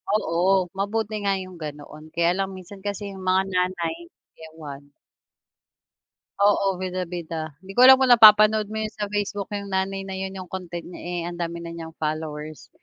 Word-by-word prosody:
Oo, 170 -5 -1 0.4
mabuti 215 +2 -1
nga 200 - +2
yung 185 -2 -11
ganoon, 150 +1 -8
kaya 170 0 +3
lang 195 0 -1
minsan 190 +2 -11
kasi 205 +1 -3
yung 190 -1 -9
mga 190 +1 +4
nanay, 180 - 0 0.5
ewan. 150 -3 -9 1.6
Oo, 200 -2 +3
bida-bida. 170 -4 -4
'Di 195 - -9
ko 245 - -2
alam 265 +1 +10
kung 260 -1 +3
napapanood 215 -1 +7
mo 220 - -5
yun 215 0 -5
sa 205 -1 -4
Facebook 205 -1 -3
yung 200 -1 -5
nanay 195 +1 -1
na 190 - -6
yun 190 0 -5
yung 185 -2 -8
content 175 -2 -6
niya 180 - -10
eh, 175 0 -4
ang 175 0 -6
dami 170 0 -3
na 170 0 -7
niyang 165 -1 -8
followers, 155 -1 -5
185 Hz, 175 wpm, -24 LUFS, 170-200 Hz, 1.6 s, alam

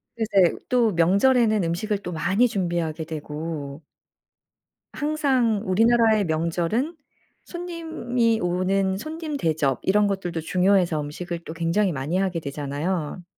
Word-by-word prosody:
글쎄 205 -6 +3
또 240 -4 +3
명절에는 215 +5 +3
음식을 195 +5 -1
또 180 -3 -6
많이 195 +9 +2
준비하게 170 -5 -2
되고 150 -1 -6 1.1
항상 270 -8 +1
우리나라의 220 +1 +3
명절은 170 - -1 0.5
손님이 320 -10 -2
오는 190 +2 0
손님 310 +4 -5
대접 155 - 0
이런 205 +2 +3
것들도 180 -4 -3
중요해서 180 -2 +2
음식을 170 +4 -5
또 160 - -6
굉장히 170 +4 +1
많이 145 +5 -2
하게 190 -3 0
되잖아요. 150 +4 -3
185 Hz, 280 characters per minute, -24 LUFS, 165-225 Hz, 1.1 s, 글쎄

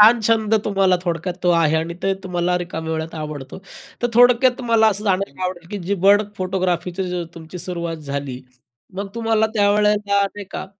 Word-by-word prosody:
छान 225 +3 +8
छंद 220 0 +2
तुम्हाला 195 -3 +3
थोडक्यात 175 +1 -2
तो 180 - +3
आहे. 165 -2 +3
आणि 165 +2 -2
ते 195 0 +2
तुम्हाला 180 -1 0
रिकाम्या 160 -2 -4
वेळात 160 +1 -4
आवडतो. 150 -3 -6 0.4
तर 240 - +4
थोडक्यात 245 +1 +6
तुम्हाला 230 -3 +3
असं 210 0 -2
जाणायला 190 -5 -1
आवडेल, 175 -2 -5
की 205 - -4
जी 200 - +1
बर्ड 205 +1 +6
फोटोग्राफीची 180 -1 -2
तुमची 165 +2 -9
सुरुवात 170 -1 -4
झाली, 140 -2 -4 0.5
मग 200 +1 -4
तुम्हाला 225 -1 +1
त्यावेळेला 210 0 +3 0.2
नाही 200 0 0
का, - - -5
185 Hz, 165 wpm, -21 LUFS, 170-210 Hz, 0.5 s, छान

